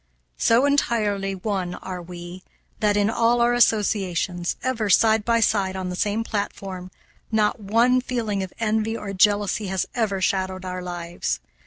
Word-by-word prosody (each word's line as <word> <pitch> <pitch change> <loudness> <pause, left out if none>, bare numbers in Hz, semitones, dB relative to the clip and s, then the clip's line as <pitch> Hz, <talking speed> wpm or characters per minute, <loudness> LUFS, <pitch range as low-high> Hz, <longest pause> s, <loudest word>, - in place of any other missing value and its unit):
So 235 +4 +4
entirely 210 -8 +1
one 185 -2 -3
are 185 -1 -6
we 175 +1 -9 0.4
that, 205 -1 +2
in 205 0 +3
all 230 +2 +2
our 240 0 +3
associations, 195 -6 +1
ever 240 -5 -1
side 220 +2 +4
by 230 +1 +2
side 195 -3 +1
on 185 -1 -3
the 180 - -4
same 210 +4 0
platform, 195 -4 -4 0.4
not 215 0 +1
one 230 +5 +3
feeling 225 -6 -2
of 190 -1 -5
envy 220 0 0
or 200 -3 -6
jealousy 205 +1 +2
has 190 -1 -1
ever 215 -5 0
shadowed 190 0 -1
our 185 0 -4
lives. 175 - -4
205 Hz, 155 wpm, -23 LUFS, 185-225 Hz, 0.4 s, So